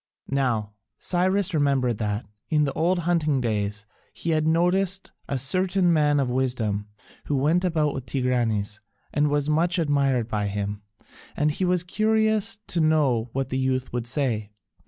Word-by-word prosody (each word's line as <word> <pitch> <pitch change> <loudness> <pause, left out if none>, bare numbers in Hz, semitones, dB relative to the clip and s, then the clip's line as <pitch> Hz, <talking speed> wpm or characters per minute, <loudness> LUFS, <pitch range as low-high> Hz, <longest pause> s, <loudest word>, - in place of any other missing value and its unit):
Now 120 -7 0 0.2
Cyrus 185 +1 +1
remembered 135 -6 +1
that, 105 0 -2 0.2
in 150 -1 +3
the 140 -2 -1
old 175 +5 +1
hunting 165 -5 +1
days, 110 -3 -2 0.3
he 165 - -3
had 155 -1 +1
noticed 180 +4 +1 0.2
a 140 - 0
certain 180 +6 +2
man 150 -2 +3
of 135 - +1
wisdom 120 -5 -1 0.4
who 145 - -1
went 155 +7 +2
about 155 -5 +1
with 125 -2 -6
Tigranes 115 -5 -1 0.3
and 150 0 +2
was 145 0 0
much 165 +3 +2
admired 140 -7 +1
by 105 -3 -1
him, 100 0 -3 0.6
and 150 +1 +2
he 185 +5 -1
was 180 -1 +2
curious 220 +2 +1
to 170 - 0
know 140 -7 +2
what 135 -1 -2
the 130 - -1
youth 130 -1 -1
would 120 -1 -2
say. 120 -6 -1
140 Hz, 155 wpm, -25 LUFS, 120-170 Hz, 0.6 s, in